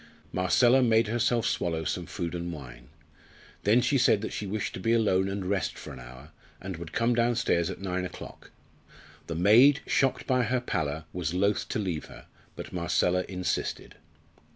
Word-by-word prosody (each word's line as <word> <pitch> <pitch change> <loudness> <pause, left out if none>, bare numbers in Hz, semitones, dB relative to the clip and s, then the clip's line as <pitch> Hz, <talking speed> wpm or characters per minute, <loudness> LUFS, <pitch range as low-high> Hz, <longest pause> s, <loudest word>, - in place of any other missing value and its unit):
Marcella 120 +8 +4
made 115 -2 +4
herself 120 0 +1
swallow 80 -2 -1
some - - -3
food 85 -1 -4
and 85 0 -4
wine. 65 -5 -10 0.8
Then 110 +5 +5
she 135 +2 +2
said 110 -3 +4
that 110 - -5
she 105 - -4
wished 105 +1 -3
to - - -6
be 115 +5 +1
alone 95 -4 +2
and 95 -1 -4
rest 95 0 -1
for - - -9
an 65 - -10
hour, 65 +4 -12 0.3
and 95 0 -6
would 80 -1 -8
come 115 +5 +1
downstairs 115 -7 +1
at 95 - -6
nine 90 -1 -2
o'clock. 90 - -9 0.8
The 80 - -4
maid, 120 - +6
shocked 135 -1 +1
by 125 -1 +2
her 125 +3 0
pallor, 80 -9 -3
was 90 -1 -3
loth 100 +3 +1
to - - -2
leave 90 -7 -3
her, - - -13 0.3
but - - -8
Marcella 90 +1 +1
insisted. 90 -1 -3
95 Hz, 175 wpm, -28 LUFS, 85-115 Hz, 0.8 s, maid